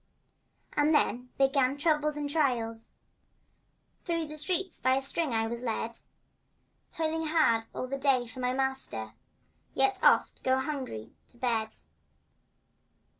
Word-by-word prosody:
And 300 +1 +3
then 250 -3 +2
began 270 0 +3
troubles 300 -1 +1
and 295 -1 -2
trials— 245 -7 -1 1.1
Through 335 -2 -1
the 305 0 -8
streets 360 +3 -2
by 260 +1 +3
a 270 - 0
string 305 +1 0
I 225 -1 +1
was 235 +1 -4
led; 230 -1 -3 0.9
Toiling 320 0 -1
hard 235 -8 +3
all - - -4
the 275 +2 -4
day 265 -3 +3
for 230 +2 -11
my 250 0 0
master, 265 0 -2 0.6
Yet 400 -1 +3
oft - - +4
going 260 0 +2
hungry 260 - -5
to - - -15
bed. 230 -3 -1
270 Hz, 130 wpm, -29 LUFS, 240-305 Hz, 1.1 s, oft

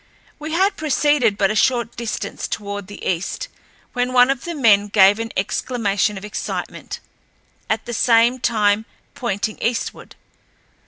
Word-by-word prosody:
We 305 +1 -5
had 390 +3 +2
proceeded 290 -7 +2
but 195 -1 +2
a - - -2
short 235 0 +1
distance 220 -3 -4
toward 205 -2 -5
the 205 - -10
east 185 - -2 0.4
when 250 0 -1
one 250 +1 +6
of 270 -3 -4
the 340 -1 -4
men 210 -7 +4
gave 200 +1 +5
an 225 0 -4
exclamation 205 0 0
of 190 - -7
excitement, 210 - -5 0.7
at - - -1
the 240 - -5
same 235 +2 +3
time 215 -2 +2 0.3
pointing 215 -2 -3
eastward. 235 +1 -3
230 Hz, 145 wpm, -20 LUFS, 205-250 Hz, 0.7 s, one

